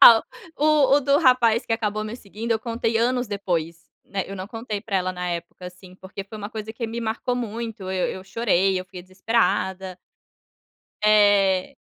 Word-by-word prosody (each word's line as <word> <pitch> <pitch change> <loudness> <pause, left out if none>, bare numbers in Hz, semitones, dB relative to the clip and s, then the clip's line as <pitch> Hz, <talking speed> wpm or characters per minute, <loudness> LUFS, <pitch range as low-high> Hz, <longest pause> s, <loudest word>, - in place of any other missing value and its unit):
ah, 225 -1 +10 0.3
o 295 -2 +4
o - - +3
do 280 +1 +3
rapaz 250 -6 +4
que - - -2
acabou 215 -2 -1
me 215 +2 -6
seguindo, 220 +1 -7
eu 225 - +1
contei 230 0 -1
anos 245 +2 +1
depois, 170 -5 -2 0.3
né, 195 -1 -3
eu 195 - -7
não 185 0 -6
contei 225 -3 -5
para 200 -2 -2
ela 185 0 0
na 180 0 -4
época, 170 +1 -6
assim, 180 0 -13
porque 190 +1 -8
foi 210 +3 -10
uma 205 +1 -6
coisa 220 -1 -6
que 230 +1 -4
me 230 +1 -5
marcou 235 +2 -2
muito, 230 -2 -5
eu 185 -1 0
eu 185 - -6
chorei, 195 -3 +1
eu 185 - -8
fui 180 0 -10
desesperada. 190 -1 -1 1.1
Eh. 205 0 +4
210 Hz, 185 wpm, -24 LUFS, 190-230 Hz, 1.1 s, ah